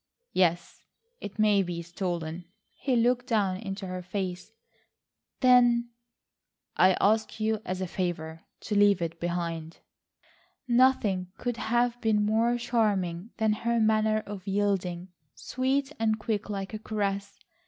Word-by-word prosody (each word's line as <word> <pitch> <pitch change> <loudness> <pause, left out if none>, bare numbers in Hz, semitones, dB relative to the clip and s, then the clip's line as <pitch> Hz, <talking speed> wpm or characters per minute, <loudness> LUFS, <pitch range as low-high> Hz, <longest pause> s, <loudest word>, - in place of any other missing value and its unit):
"Yes, 175 -2 +1 0.4
it 205 - -8
may 210 -2 +4
be 175 -2 -4
stolen." 175 -1 -4 0.3
He 260 -3 -1
looked 245 +1 +2
down 205 -6 +1
into 195 -1 -6
her 185 0 -5
face. 185 +1 -4 0.9
"Then—" 240 -2 +5 0.8
"I 185 0 +5
ask 220 +2 +1
you 220 0 0
as 185 +1 -3
a 185 - -2
favour 165 -3 -3 0.2
to 215 - -4
leave 205 -2 +5
it 165 0 -4
behind." 170 -2 -3 0.9
Nothing 235 -7 +3
could 245 -2 -3
have 240 +1 0
been 215 -2 +2
more 225 +3 +2
charming 210 -6 0
than 220 -1 +2
her 235 +2 0
manner 215 0 +2
of 200 -1 -8
yielding, 190 -3 -1 0.3
sweet 270 +2 -1
and 220 -1 +1
quick 215 -1 -3
like 195 0 -4
a 215 - -4
caress. 200 -2 -3
205 Hz, 130 wpm, -28 LUFS, 185-225 Hz, 0.9 s, Then